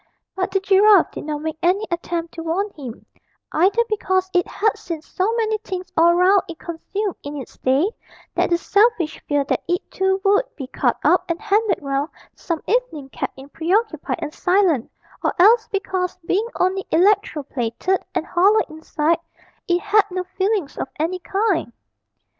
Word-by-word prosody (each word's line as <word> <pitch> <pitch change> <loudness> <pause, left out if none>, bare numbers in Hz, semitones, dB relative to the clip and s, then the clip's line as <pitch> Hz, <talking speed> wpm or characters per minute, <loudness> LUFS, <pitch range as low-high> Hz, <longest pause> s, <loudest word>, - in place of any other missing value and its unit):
But 375 0 -1
the 390 +1 +1
giraffe 395 0 +5
did - - -7
not 300 -1 -4
make 315 0 -4
any 380 +5 +2
attempt 340 -1 -3
to 330 - -6
warn 365 +6 -1
him, 260 -9 -9 0.5
either 385 +8 +3
because 375 -3 0
it 355 -1 +2
had 435 0 0
seen 360 -7 -6
so 375 +6 -1
many 440 -2 0
things 370 -3 -6
all 340 +1 +5
round 370 +2 +5
it 335 - -7
consumed 380 +5 -4
in 290 +1 -6
its 265 - -9
day 270 +7 +2 0.5
that - - +1
the 345 - +3
selfish 405 -3 +2
fear 290 -1 +2
that 275 - -1
it 355 0 -2
too 380 0 +1
would 405 +5 +4
be 275 - -6
cut - - 0
up - - +4
and 335 0 -1
handed 425 0 +1
round 275 +2 -1 0.3
some 335 -3 -4
evening 410 - -1
kept - - -5
it 270 +2 -13
preoccupied 345 0 0
and 300 - -5
silent, 355 - +2 0.3
or - - 0
else 440 +5 +6
because, 375 -4 -2
being 410 +7 +1
only 380 +1 +1
electro 370 -3 +2
plated 265 +9 -1
and 345 -2 0
hollow 395 +6 +4
inside, 315 +1 -1 0.5
it 350 0 +2
had 415 0 +3
no 365 0 -3
feelings 380 -2 -2
of - - -2
any 340 +4 -1
kind. 390 - 0
365 Hz, 170 wpm, -21 LUFS, 320-405 Hz, 0.5 s, else